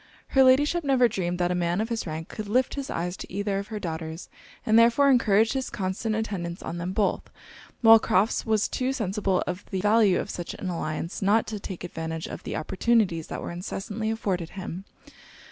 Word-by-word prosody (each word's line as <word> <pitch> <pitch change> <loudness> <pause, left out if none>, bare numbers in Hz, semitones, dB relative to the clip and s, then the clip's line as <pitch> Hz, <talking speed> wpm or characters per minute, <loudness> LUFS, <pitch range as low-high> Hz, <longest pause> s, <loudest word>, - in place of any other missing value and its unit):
Her 270 - +4
Ladyship 290 +6 +4
never 265 -3 +4
dreamed 180 -5 -2
that 175 0 +1
a - - +2
man 175 +1 0
of 220 +2 -1
his 230 -5 -3
rank 160 +1 -5
could 215 -1 -7
lift 250 +4 +2
his 280 -1 -5
eyes 175 +2 -2
to - - -9
either 200 +1 -1
of 200 - -6
her 215 - -5
daughters, 160 -1 -5 0.4
and 220 +1 +5
therefore 240 +5 +5
encouraged 220 -2 +3
his 265 -1 -2
constant 205 +2 -2
attendance 190 -6 -4
on 170 +1 -5
them 175 +2 -3
both; 200 +1 0 0.5
while 225 -1 +9
Crofts 205 +2 +1
was 220 -2 +1
too 260 +1 -1
sensible 195 -5 0
of 180 +2 -4
the 190 - -2
value 210 -1 +4
of - - -4
such 175 - -5
an 185 - -5
alliance 165 0 -4
not 210 +4 +3
to 215 -1 -5
take 190 -2 -7
advantage 160 -2 -5
of - - -7
the - - -5
opportunities 185 -1 +1
that - - -5
were - - -5
incessantly 205 +5 -4
afforded 190 -7 -2
him. 190 -1 -7
200 Hz, 200 wpm, -26 LUFS, 175-225 Hz, 0.5 s, while